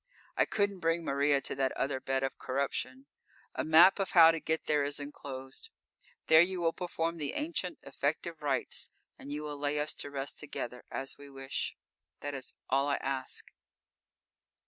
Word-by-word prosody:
I - - +4
couldn't 200 -2 0
bring 165 0 +1
Maria 140 0 +3
to - - -3
that 135 -1 +1
other 135 -1 -1
bed 135 0 -1
of 135 - -2
corruption. 130 0 -2 0.5
A - - -1
map 170 +6 +7
of 195 - -1
how 165 -2 +9
to 165 - -2
get 160 +1 -1
there 150 -1 +2
is 145 +1 -1
enclosed. 140 - -7 0.6
There 160 0 +8
you 185 +1 +1
will 165 -1 +2
perform 170 -1 -2
the 150 -3 -3
ancient, 295 - -2
effective 155 +4 -2
rites, 140 -3 -1 0.3
and 140 - -8
you 150 +1 -3
will 145 -1 -5
lay 145 +1 0
us 150 +1 0
to - - -3
rest 140 0 -4
together, 125 -4 -6
as 135 +1 -4
we 145 0 -11
wish. 135 -1 -4 0.5
That 145 0 -3
is 135 -2 -5
all 135 +2 +2
I 140 - +2
ask.... 135 -1 -4
145 Hz, 175 wpm, -32 LUFS, 135-165 Hz, 0.6 s, how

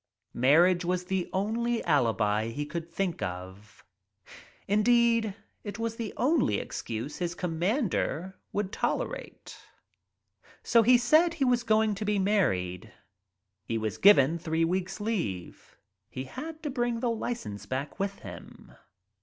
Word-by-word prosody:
Marriage 170 +8 +4
was 180 +1 -1
the 185 -1 -2
only 230 +4 -1
alibi 110 - +2
he 145 +6 -4
could 165 +2 -5
think 175 0 -2
of. 95 +3 -7 0.8
In 205 +2 +3
deed, 230 -2 +3 0.3
it 205 0 -6
was 230 0 -2
the 230 -3 -4
only 260 - +2
excuse 115 - -5
his 175 -1 -2
commander 180 - -1 0.2
would 205 -1 -2 1.9
Se 230 - +5
he 245 +3 +6
said 310 +8 +4
he 280 -5 +1
was 245 -1 +3
going 220 -2 +2
to 200 +2 -4
be 210 0 +1
married. 95 - 0 0.7
He 115 - -2
was 110 -1 -3
given 170 -5 +6
three 165 0 0
weeks' 185 +3 -2
leave. 175 - -4 0.3
He 130 - -5
had 315 - -8
to 295 - -2
bring 240 -2 -1
the 240 0 0
license 220 - -4
back 135 - -4
with 195 0 -2
him. 90 -3 -11
185 Hz, 135 wpm, -28 LUFS, 135-230 Hz, 1.9 s, he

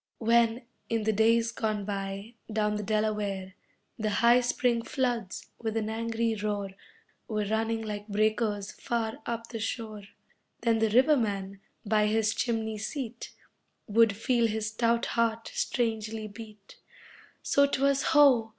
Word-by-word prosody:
When, 230 +1 +3 0.3
in 225 -1 0
the 220 +1 +1
days 230 +2 +3
gone 215 -3 -2
by, 200 +2 -4 0.2
down 210 -1 +1
the 210 - -2
Delaware 210 -3 -1 0.5
The 215 -1 0
high 235 +4 +5
Spring 245 -1 +1
floods, 240 -6 -2
with 225 -1 -2
an 220 0 -1
angry 230 0 -1
roar 205 -2 -2 0.6
Were 215 -2 -1
running 225 +2 -1
like 210 -1 -5
breakers 215 -1 0
far 225 -2 -3
up 230 -1 -4
the 230 - -5
shore, 215 -2 -4 0.6
Then 230 -1 +2
the 220 0 +2
riverman 210 -6 +2 0.3
by 210 0 +3
his 220 0 +2
chimney 220 -3 -1
seat 240 +1 -5 0.5
Would 220 -1 +3
feel 235 0 +2
his 215 -1 -2
stout 235 +1 +1
heart 230 -1 0
strangely 220 -2 -1
beat 210 -1 -12 0.7
So 280 0 +4
'twas 275 0 +2
ho! 275 -8 +5
220 Hz, 135 wpm, -29 LUFS, 210-230 Hz, 0.7 s, high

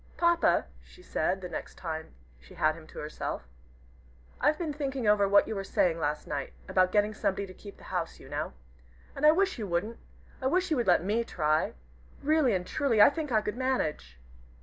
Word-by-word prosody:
"Papa," 340 -1 +3 0.2
she 365 - -17
said, 185 - -1
the 180 - -5
next 175 - -6
time 160 - -6 0.2
she 60 - -16
got 155 0 +2
him 160 0 -13
to - - -14
herself, 150 - -5 0.9
"I've 295 +3 +3
been 315 -3 -3
thinking 275 -4 -3
over 205 -1 +4
what 200 0 +5
you - - -3
were 195 -2 -3
saying 175 -3 +1
last 150 -1 -1
night, 140 -2 -4
about 185 -1 +3
getting 210 +1 +2
somebody 200 -1 -1
to 185 - -11
keep 200 +1 -12
the - - -16
house, 170 -2 -2
you - - -13
know. 145 - -4 0.6
And 295 +2 +3
I - - +9
wish 380 -2 +1
you 210 - -3
wouldn't. 190 +6 -2 0.4
I 260 - +1
wish 365 +5 +1
you 310 - +3
would 240 - 0
let 175 -2 +4
me 215 +5 +1
try. 155 -7 0 0.5
Really 295 -6 +3
and 180 -1 -2
truly, 235 +1 +1
I 205 - +9
think 300 -1 -4
I 215 -2 +3
could 210 +2 -4
manage." 155 - -1
205 Hz, 205 wpm, -29 LUFS, 165-270 Hz, 0.9 s, I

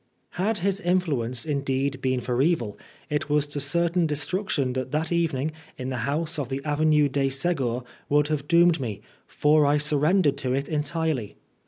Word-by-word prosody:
62 - - -20
VI - - +1
HAD 225 -1 +1
his 195 +2 +1
influence 155 - 0
indeed 140 -2 -1
been 130 -1 0
for 125 +1 0
evil, 135 - +1 0.4
it 150 0 -1
was 150 0 +2
to 145 0 -5
certain 170 +4 +1
destruction 150 -3 -1
that 130 -1 -3
that 155 +2 -1
meeting 160 -4 0 0.3
in 130 0 -4
the 130 - -3
house 160 +2 -1
of 135 -4 -3
the 135 0 -2
Avenue 150 0 +3
de 135 0 0
Se"gur 135 -4 0 0.3
would 150 +1 +3
have 145 -2 -2
doomed 170 0 +5
me, 110 -6 -4 0.3
for 150 +1 +3
I 145 +1 +3
surrendered 150 +1 +2
to 130 -2 -1
it 140 +1 -2
entirely. 155 -6 -2
145 Hz, 180 wpm, -25 LUFS, 135-160 Hz, 0.4 s, doomed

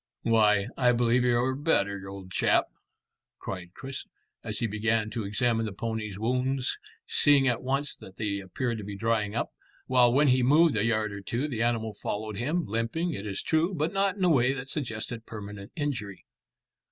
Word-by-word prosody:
"Why, 105 -3 +4
I 125 -1 +4
believe 120 +1 +3
you're 125 +1 +2
better, 100 -10 0
old 95 -1 -9
chap," - - +3 0.7
cried 90 -1 -7
Chris, 135 0 -7 0.4
as 110 - -3
he 120 - 0
began 110 0 0
to 115 -2 -3
examine 115 +2 +1
the - - -4
pony's 110 -1 -4
wounds, 125 +4 0 0.3
seeing 140 -2 +4
at 120 -2 +1
once 135 +2 -1
that 95 - -13
they 100 -2 -1
appeared 110 +5 -3
to - - -6
be 100 0 -6
drying 110 -1 0
up, 120 - -1 0.3
while 125 -2 +5
when 140 +3 +4
he 130 0 +4
moved 150 +4 +5
a 100 - +2
yard 110 -2 +1
or 100 0 -6
two 120 +9 -2
the 125 -6 -3
animal 115 -2 0
followed 105 0 -4
him, 155 - 0
limping, 115 - -1
it 100 +2 -5
is 100 -1 -3
true, 165 +4 +1
but 155 +4 -1
not 195 0 +1
in 190 - -2
a 180 - +5
way 130 -4 +4
that 135 0 -6
suggested 115 -4 -4
permanent 105 -2 -8
injury. 115 - -4
115 Hz, 185 wpm, -28 LUFS, 105-130 Hz, 0.7 s, while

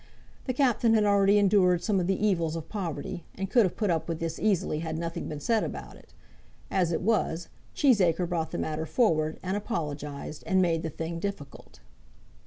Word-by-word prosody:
The 255 - -1
Captain 240 -4 +3
had 215 - +4
already 200 0 +4
endured 190 -3 +4
some 205 -4 +1
of 175 - -1
the 195 - +1
evils 170 -6 +1
of 165 -1 -6
poverty, 170 -5 -4
and 195 0 -4
could 240 -5 +5
have 180 - -2
put 210 -5 +1
up 165 0 -1
with 165 -1 -2
this 165 -1 -3
easily 190 -7 +1
had 160 -1 -3
nothing 165 0 -4
been 150 - -5
said 225 +8 +1
about - - -6
it. - - -19 0.6
As 180 -3 +1
it 170 - -1
was, 180 -6 0 0.3
Cheesacre 185 - +3
brought 165 -2 -2
the - - -4
matter 160 +1 -3
forward, 155 -5 +1
and 190 +1 -1
apologized, 150 - -4
and 190 -2 +3
made 170 -3 +2
the 165 - -3
thing 165 +2 -5
difficult. 165 -8 -7
175 Hz, 195 wpm, -28 LUFS, 160-205 Hz, 0.6 s, could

